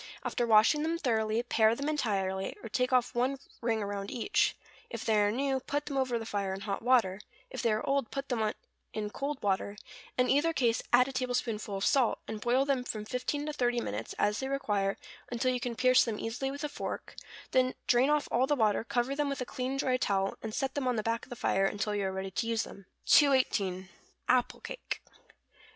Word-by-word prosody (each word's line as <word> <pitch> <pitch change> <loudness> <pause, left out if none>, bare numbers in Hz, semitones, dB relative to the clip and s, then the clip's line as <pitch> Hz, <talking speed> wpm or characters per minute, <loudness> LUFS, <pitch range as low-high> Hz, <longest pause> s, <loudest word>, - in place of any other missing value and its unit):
After 240 -2 -1
washing 220 +7 +5
them 325 +2 0
thoroughly, 225 -5 0
pare 225 -2 +3
them 280 +4 -3
entirely, 195 -10 -1
or 225 - -6
take 250 +4 0
off 250 -1 +2
one 255 +3 +1 0.2
ring 225 -2 0
around 200 0 -4
each; 320 - +1 0.3
if - - -6
they 220 - +3
are 205 0 +3
new, 265 +3 0
put 290 +3 -3
them 290 - -4
over 260 -3 +1
the 225 - -5
fire 200 -3 -2
in 195 - -8
hot 195 -1 -3
water; 225 -6 +3 0.3
if - - -4
they 235 -3 +2
are 215 0 0
old, 275 -4 +1
put 275 0 -4
them 240 -4 0
on 215 -1 0 0.4
in 210 -1 -3
cold 280 +3 -3
water; 200 +1 0 0.4
in 250 0 +3
either 300 +5 +3
case, 235 -6 +2
add 250 +1 +6
a - - -4
tablespoonful 245 -5 -2
of 195 - -1
salt, 265 -5 +3
and 215 -1 -5
boil 255 +4 +2
them 275 -3 +1
from 215 -3 -4
fifteen 255 +5 -2
to 300 - -3
thirty 245 -4 +1
minutes, 110 - -4
as 210 +1 +1
they 265 - -2
require, 205 -8 0 0.3
until 255 +2 +1
you 250 - -1
can 240 -1 -3
pierce 255 +1 +5
them 225 -3 -2
easily 235 +5 -3
with 285 +2 -6
a - - 0
fork; - - -5 0.4
then 255 0 +2
drain 250 +3 +4
off 300 -1 +2
all 255 +2 +3
the 290 - +2
water, 220 -5 +2
cover 245 +3 -1
them 290 0 0
with 275 - -3
a 255 - -2
clean 255 +2 -3
dry 260 -2 +1
towel, 195 -4 0
and 220 -1 -5
set 270 -1 -1
them 280 -3 -1
on 250 - +2
the 215 - -1
back 230 +2 -1
of - - -22
the 245 - -6
fire 195 -4 +2
until 210 +1 -2
you 205 -1 -1
are 190 - -1
ready 190 0 -4
to 230 - -2
use 230 -1 +1
them. 195 -1 -12 0.2
218. 205 -10 +3 0.4
=Apple 250 -1 +2
Cake. - - -6
240 Hz, 225 wpm, -31 LUFS, 210-265 Hz, 0.4 s, add